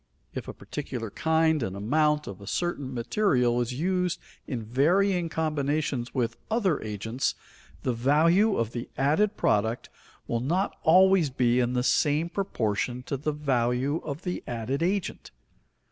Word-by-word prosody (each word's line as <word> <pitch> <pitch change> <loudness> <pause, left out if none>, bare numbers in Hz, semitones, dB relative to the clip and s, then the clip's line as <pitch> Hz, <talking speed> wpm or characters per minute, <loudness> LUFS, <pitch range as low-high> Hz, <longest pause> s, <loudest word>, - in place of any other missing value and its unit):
If - - -5
a - - -5
particular 125 -7 -5
kind 160 +3 +2
and 95 -5 -3
amount 150 +8 +1
of 100 0 -8
a 100 - -11
certain 160 -7 -2
material 125 - +1
is 120 +1 -2
used 180 +3 0 0.3
in 120 -4 -3
varying 170 - +2
combinations 150 -5 -1
with 115 -3 -1
other 205 -9 +1
agents, 110 +4 -2 0.5
the 125 - 0
value 165 - +3
of 115 -1 -1
the 120 -1 -5
added 175 +11 +2
product 110 +3 0 0.3
will 120 - -1
not 175 - 0
always 185 -1 +5
be 125 -1 +2
in 125 0 +1
the 125 0 +1
same 150 +5 +2
proportion 125 - -2
to 125 - -3
the 150 +3 -2
value 135 -1 0
of 150 +2 -5
the 180 -1 -3
added 120 +4 -2
agent. 190 +3 -1
140 Hz, 145 wpm, -27 LUFS, 120-165 Hz, 0.5 s, always